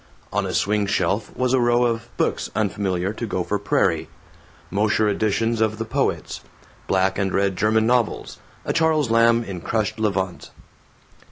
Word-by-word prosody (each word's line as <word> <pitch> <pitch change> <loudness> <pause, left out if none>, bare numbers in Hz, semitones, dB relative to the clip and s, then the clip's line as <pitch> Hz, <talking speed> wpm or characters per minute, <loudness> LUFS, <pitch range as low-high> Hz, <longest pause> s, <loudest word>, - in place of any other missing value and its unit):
On - - 0
a - - -4
swing 105 0 +1
shelf 100 +2 0
was 125 0 +1
a 130 - +4
row 120 0 +3
of 115 0 -2
books - - -1
unfamiliar 95 -2 -1
to 115 +1 -5
Gopher 100 +1 -2
Prairie: 100 - +1 0.6
Mosher 105 +2 +2
editions 110 +2 0
of 110 -1 +1
the 115 - -3
poets, - - -2 0.5
black 95 +1 +1
and 95 -1 0
red 100 0 +1
German 110 +3 +2
novels, 120 -1 0 0.3
a - - -1
Charles 155 -6 +2
Lamb 115 0 +4
in 95 -5 -6
crushed 110 +3 -1
levant. 95 -4 -2
110 Hz, 155 wpm, -22 LUFS, 100-115 Hz, 0.6 s, a